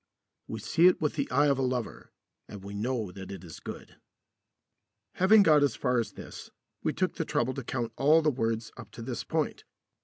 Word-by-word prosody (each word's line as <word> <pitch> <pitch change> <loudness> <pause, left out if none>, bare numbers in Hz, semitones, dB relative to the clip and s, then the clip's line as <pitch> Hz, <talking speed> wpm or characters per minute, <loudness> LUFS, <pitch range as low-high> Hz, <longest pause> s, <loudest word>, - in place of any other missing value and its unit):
We 110 - -5
see 165 - +4
it 185 - +4
with 150 -2 0
the 140 -2 -2
eye 145 - +3
of 140 -2 +2
a - - +1
lover, 125 -4 -3 0.4
and 100 -2 -10
we 100 +1 -8
know 110 -1 -2
that 95 0 -9
it 95 -2 -8
is 85 -3 -10
good. - - -9 1.2
Having 205 +3 +6
got 155 -4 +5
as 140 -5 +2
far 125 -2 +1
as 115 - -3
this, - - -10 0.3
we - - 0
took - - -1
the - - 0
trouble 130 +2 0
to 135 - -5
count 115 -1 -3
all 155 +4 +5
the 150 - +3
words 115 -3 -2
up - - -10
to 115 - -8
this 120 -1 -4
point. - - -2
125 Hz, 210 wpm, -29 LUFS, 110-145 Hz, 1.2 s, Having